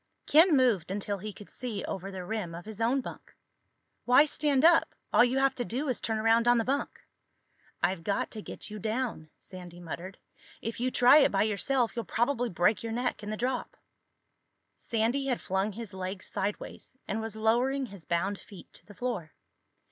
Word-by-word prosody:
Ken 320 0 +6
moved 230 -10 +2
until 200 +1 -3
he 210 +3 -5
could 205 0 -13
see 235 -6 -3
over 195 +1 -5
the 190 -2 -6
rim 200 -5 -3
of 175 - -9
his 220 0 -8
own 250 +4 +2
bunk. - - -10 0.7
"Why 250 +4 +7
stand 290 -1 +1
up? 335 0 +5 0.2
All - - +7
you 250 +2 +1
have 270 0 +3
to 250 - -3
do 260 +6 -3
is 250 - -1
turn 220 -1 -1
around 225 +2 +3
on 240 0 +6
the 230 - +2
bunk." 275 +4 -2 0.8
"I've 185 -3 +1
got 200 +3 -1
to 215 - -7
get 210 - -9
you 210 - -6
down," 220 -6 -3
Sandy 180 -2 -11
muttered. 175 +2 -7 0.4
"If 225 +1 -5
you 250 +1 +1
try 250 +4 +7
it 285 - +4
by 195 - +3
yourself 230 +4 0
you'll 235 - -3
probably 240 +1 0
break 185 +3 +2
your 225 -1 -4
neck 245 -2 -1
in 210 - -6
the 215 - -3
drop." 250 +2 -2 1.0
Sandy 235 +5 -1
had 250 -3 0
flung 190 +2 -1
his 220 -1 -8
legs 185 0 -5
sideways 205 +5 -5
and 215 +3 -2
was 220 -1 -4
lowering 245 +5 +1
his 200 -7 -11
bound 175 +5 -1
feet 195 0 -14
to - - -14
the 205 - -13
floor. 195 -9 -4
225 Hz, 195 wpm, -29 LUFS, 195-250 Hz, 1.0 s, Why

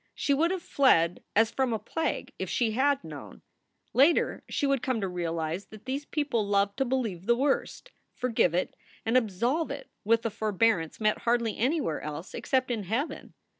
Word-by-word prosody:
She 280 - +1
would 320 +5 +3
have 370 -1 -2
fled 175 -11 +3
as 225 +2 +4
from 260 -2 0
a - - +1
plague 325 +8 -3
if - - -3
she 235 -3 +1
had 275 +4 +2
known. - - -10 0.5
Later 285 +6 +4
she - - 0
would 275 -3 +2
come 255 -3 0
to 195 - -1
realize 170 0 -3
that 215 +1 -13
these 275 +3 -3
people 280 -8 0
loved 200 0 +1
to 270 - +1
believe 225 -8 -2
the 235 - +5
worst, 280 - -1 0.2
forgive 225 -9 +1
it, 180 - -1 0.3
and 225 +2 +1
absolve 250 - +1
it 280 0 -7
with 230 +2 +2
a 230 - 0
for 215 +1 -2
bearance 190 -6 +1
met 215 -1 +2
hardly 235 -2 +1
anywhere 260 - 0
else 150 +3 -6
except 260 -2 0
in 215 -4 -2
heaven. 235 - -3
230 Hz, 185 wpm, -28 LUFS, 200-270 Hz, 0.5 s, the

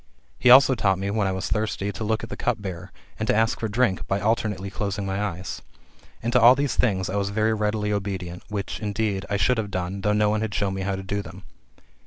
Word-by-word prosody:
He 125 - +4
also 130 +1 +8
taught 95 -6 +1
me, 100 +1 -2
when 105 -2 +1
I - - 0
was 95 +1 -3
thirsty, 105 -2 -1
to 110 - -6
look 110 +1 -1
at - - -7
the - - -3
cup 120 -3 -1
bearer, 95 -4 -7 0.3
and 110 - -2
to - - +3
ask 115 +1 +2
for 110 - -1
drink 110 -2 0
by 95 - 0
alternately 105 -3 -1
closing 100 0 -3
my 95 +1 -2
eyes. 95 -2 -5 0.6
And 120 +1 -1
to 125 - +5
all 120 +3 +8
these 140 0 -1
things 95 -6 +1
I 100 - -2
was 100 0 0
very 110 +2 +1
readily 105 -1 -1
obedient; 95 -3 -4
which, 105 -1 -4
indeed, 105 -4 -2
I 100 - 0
should 125 +3 +2
have 105 -2 -3
done, 95 +1 -3
though 105 - +1
no 105 0 +3
one 110 0 0
had 110 -2 -3
shown 100 -2 0
me 95 - -4
how 95 0 -1
to 95 - -6
do 100 +2 -2
them. 95 -1 -11
100 Hz, 250 wpm, -24 LUFS, 95-110 Hz, 0.6 s, also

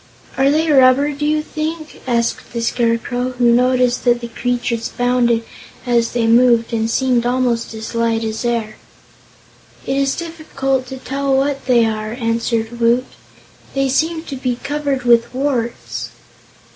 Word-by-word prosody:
"Are 270 +1 +3
they 315 +2 +2
rubber, 270 +1 +5
do 295 +1 -2
you 305 0 +1
think?" 310 0 -5
asked 235 -2 -1
the 235 - -2
Scarecrow, 240 +2 0
who 240 -1 +4
noticed 250 0 +2
that 240 -1 +3
the 235 -1 -7
creatures 240 -1 -2
bounded, 245 -2 +1 0.4
as 235 -2 +1
they 235 -1 +1
moved, 235 0 +4
and 225 0 0
seemed 250 -1 +1
almost 245 -2 0
as 220 +2 -7
light 230 -1 0
as 220 +1 -3
air. 230 -3 -2 1.1
"It 270 - -1
is 275 0 +1
difficult 275 -6 -3
to 265 - -7
tell 275 +1 -1
what 275 -1 -1
they 240 -3 +4
are," 215 0 -3
answered 230 -1 -2
Woot, 235 +2 +3 0.7
"they 275 0 +1
seem 320 +4 0
to 280 - -6
be 255 -2 -2
covered 285 -2 -2
with 235 -1 +4
warts." 255 -4 -2
245 Hz, 150 wpm, -18 LUFS, 235-275 Hz, 1.1 s, rubber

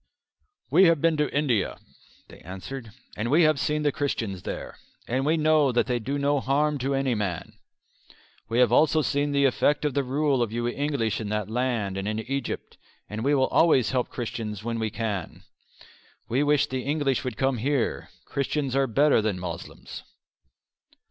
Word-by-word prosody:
"We 190 - +6
have 165 -3 +4
been 165 +1 +2
to 150 -1 0
India," 135 -8 0 0.5
they - - -14
answered, 105 +7 -8 0.2
"and 110 +3 -2
we 160 +5 +5
have 155 -2 +3
seen 150 +2 0
the 145 - +2
Christians 115 -10 -2
there, - - -6 0.3
and 130 +4 0
we 160 +2 +3
know 155 -3 +3
that 120 - +2
they 125 -1 -1
do 135 +5 -3
no 140 0 +1
harm 145 +2 +1
to 135 +2 -1
any 135 -2 +1
man. 100 -7 -3 1.0
We 115 - -1
have 125 -2 +5
also 155 +4 +4
seen 145 +1 0
the 140 0 +3
effect 145 +3 +2
of 145 - 0
the 140 - +1
rule 135 0 +1
of 115 -3 0
you 120 +1 -2
English 120 -5 -1
in 105 - -4
that 105 0 -2
land 115 -5 -1
and 95 +1 -3
in 110 0 -1
Egypt, 135 +4 -5 0.3
and 110 +2 -4
we 145 +2 +3
will 130 -1 +3
always 135 -9 +4
help 125 -2 0
Christians 110 -4 -5
when 115 0 -2
we 110 -1 -1
can. 105 -5 -4 0.8
We 125 +4 +1
wish 145 -1 +3
the 130 0 -3
English 140 -2 0
would 125 -4 -4
come 135 -1 +1
here; 135 0 -1 0.2
Christians 140 -1 -2
are 135 0 +2
better 140 +1 +3
than 105 -3 -1
Moslems." 90 -2 -7
130 Hz, 180 wpm, -26 LUFS, 115-145 Hz, 1.0 s, We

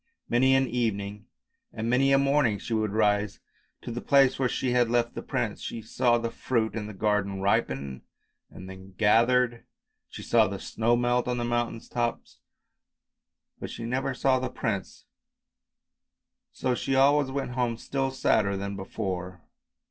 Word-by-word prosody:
Many 130 +2 +4
an 135 0 +2
evening 105 -4 -2 0.4
and 110 +1 -4
many 130 +3 +3
a 135 - +6
morning 140 -5 +2
she 115 - -5
would 110 -1 +1
rise 105 -1 +1 0.4
to - - -5
the 120 +1 -4
place 135 -2 +4
where 130 -2 +2
she 125 - -1
had 120 -1 +3
left 120 0 +1
the - - -5
prince. - - -3
She 115 - -6
saw 120 +2 +2
the 115 0 -3
fruit 115 -2 -1
in 110 -2 -4
the 105 - -9
garden 100 -1 0
ripen, 70 -9 -1 0.5
and 95 - -11
then 95 0 -12
gathered, 120 +3 +3 0.5
she - - -9
saw 115 -2 +4
the 100 0 -4
snow 115 +4 0
melt 120 0 +1
on 125 0 -1
the 120 - -2
mountain 120 -1 -1
tops, 120 -1 -4 1.2
but - - -6
she 115 - -7
never 130 +3 -2
saw 130 0 +2
the 130 - -3
prince, 100 -5 -4 1.5
so 130 - -1
she 135 +2 -1
always 140 +1 +4
went 135 -2 -3
home 120 -2 -1
still 135 +2 -2
sadder 110 -6 +1
than 100 +1 -4
before. 95 -3 -5
115 Hz, 165 wpm, -27 LUFS, 105-125 Hz, 1.5 s, a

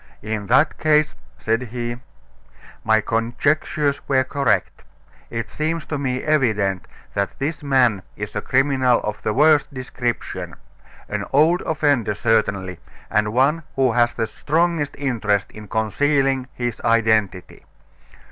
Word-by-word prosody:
"In 105 -1 -4
that 145 +10 +3
case," 155 0 +3 0.2
said 115 +2 0
he, 120 0 -4 0.9
"my 110 0 +3
conjectures 140 +6 0
were 130 -1 +3
correct. 140 +1 0 0.5
It 115 -2 -4
seems 155 +6 -3
to 150 - -4
me 130 -2 -2
evident 110 -11 +1 0.3
that 100 0 -2
this 145 +2 -3
man 130 -8 +2
is - - -6
a - - -1
criminal 130 -2 +2
of 105 0 -4
the - - -1
worst 150 +4 +4
description 125 -3 -4 0.5
an - - -3
old 160 +6 +4
offender 145 -9 +1
certainly, 100 -5 0 0.3
and 105 -1 +1
one 135 +7 +2
who 130 -2 +3
has 120 +1 +2
the 115 - 0
strongest 155 +3 -1
interest 110 -8 -1
in 105 -1 -11
concealing 135 +5 +1
his 120 -2 -3
identity. 110 -5 +1
125 Hz, 130 wpm, -21 LUFS, 110-145 Hz, 0.9 s, worst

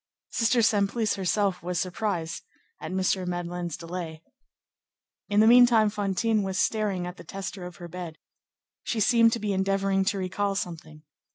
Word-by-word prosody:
Sister 235 +1 +2
Simplice 210 +1 +2
herself 195 0 0
was 175 +1 -2
surprised 180 -3 -3 0.4
at - - -5
M. 185 0 0
Madeleine's 175 -1 -4
delay. 165 -1 -6 1.1
In 205 +1 +4
the - - +6
meantime, 235 -2 +6
Fantine 210 +2 0
was 190 -1 -3
staring 205 -5 0
at 180 +1 -7
the - - -11
tester 190 -1 -6
of 180 - -11
her 175 - -9
bed. 170 -2 -7 0.6
She 230 - -2
seemed 230 +2 +5
to 235 - -1
be 210 -2 -1
endeavoring 195 0 +1
to 200 0 0
recall 195 +2 -1
something. 160 -4 -6
195 Hz, 155 wpm, -27 LUFS, 180-210 Hz, 1.1 s, the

